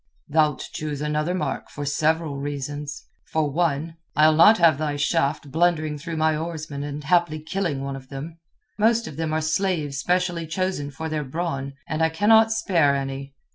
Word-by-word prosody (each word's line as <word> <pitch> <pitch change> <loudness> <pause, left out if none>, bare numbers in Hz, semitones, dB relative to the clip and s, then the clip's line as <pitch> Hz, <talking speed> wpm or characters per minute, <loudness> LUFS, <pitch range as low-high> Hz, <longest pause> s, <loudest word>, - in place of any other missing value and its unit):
"Thou'lt 150 -2 +1
choose 150 -2 -4
another 150 +4 -1
mark 185 - -3
for 145 - -6
several 155 +1 0
reasons. 145 +1 -5 0.2
For 155 -2 0
one, 160 0 -1 0.2
I'll 155 +1 +6
not 170 +8 +7
have 165 -5 +4
thy 150 -2 -1
shaft 145 -1 0
blundering 155 -2 +1
through 165 +2 -5
my 155 0 +2
oarsmen 155 -3 -5
and 145 0 -5
haply 170 0 +2
killing 155 -3 -2
one 140 0 -4
of 130 -1 -11
them. 155 +4 -7 0.4
Most 230 +2 +3
of 150 - -8
them 160 0 -2
are 155 0 0
slaves 155 -3 0
specially 175 0 0
chosen 185 -3 -2
for 160 +3 -6
their 155 -1 -2
brawn, 140 -2 -3
and 155 0 -2
I 160 - +4
cannot 220 +6 +5
spare 170 -10 +2
any. 135 0 -4
155 Hz, 175 wpm, -24 LUFS, 145-170 Hz, 0.4 s, not